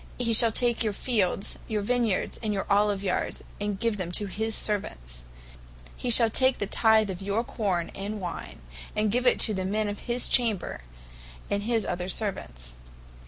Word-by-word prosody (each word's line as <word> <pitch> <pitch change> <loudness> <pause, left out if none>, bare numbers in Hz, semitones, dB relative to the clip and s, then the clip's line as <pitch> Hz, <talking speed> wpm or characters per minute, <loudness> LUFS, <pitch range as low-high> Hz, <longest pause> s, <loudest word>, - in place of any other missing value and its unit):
He 230 -2 0
shall 230 0 +6
take 235 +1 +3
your 215 -2 -1
fields, 200 -4 -1
your 210 -2 -2
vine 245 +2 +1
yards, 200 -5 -2
and 215 -2 -2
your 195 -2 -2
olive 205 -1 +2
yards, 185 -2 -2 0.2
and 205 -1 -3
give 230 -1 0
them 180 -3 -4
to 205 - +1
his 220 +3 -3
servants. - - -4 0.7
He 245 - -4
shall 230 -1 +7
take 260 +2 +3
the 205 - -2
tyth 220 0 +3
of 185 0 -7
your 200 +4 -1
corne 190 -8 -2
and 205 +2 -5
wine, 175 - -7 0.3
and 210 -1 +1
give 250 +3 +1
it - - +4
to 220 - +4
the 190 -1 -2
men 210 +3 -1
of 205 0 -4
his 240 +1 +1
chamber, 225 - 0 0.7
and 200 0 0
to 205 - -7
his 230 -2 +1
other 180 +1 -3
servants. - - -3
210 Hz, 190 wpm, -27 LUFS, 195-225 Hz, 0.7 s, shall